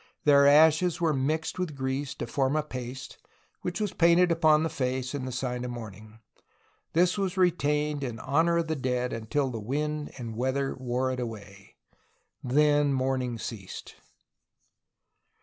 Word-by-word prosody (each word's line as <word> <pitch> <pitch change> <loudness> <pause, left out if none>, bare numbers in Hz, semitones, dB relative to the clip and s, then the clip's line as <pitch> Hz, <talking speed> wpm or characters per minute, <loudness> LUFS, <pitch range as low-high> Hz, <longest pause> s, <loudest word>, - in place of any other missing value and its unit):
Their 140 -1 +6
ashes 155 +4 +5
were 165 -3 +2
mixed 155 +6 -1
with 175 -5 -3
grease 130 0 -3
to - - -4
form 135 +3 0
a 155 - +1
paste, 130 -2 -7 0.4
which 175 -1 -3
was 210 -3 -2
painted 170 +1 +4
upon 155 -2 +4
the 160 - 0
face 130 -1 -2
in 130 -2 -4
sign 125 -1 -3
of 125 - -4
mourning. 110 -2 -9 0.8
This 180 +4 +2
was 195 -1 -2
retained 150 -5 +1
in 120 -4 -4
honor 165 +5 +2
of 170 -1 0
the 160 - -1
dead 125 -2 -1
until 130 +5 -1
the 115 - -5
wind 150 +6 -3
and 115 -4 -6
weather 130 +3 -1
wore 130 0 -2
it 130 - -4
away. 100 -4 -8 0.7
Then 145 +2 +3
mourning 130 -2 -1
ceased. 105 -4 -7
135 Hz, 150 wpm, -28 LUFS, 125-155 Hz, 0.8 s, Their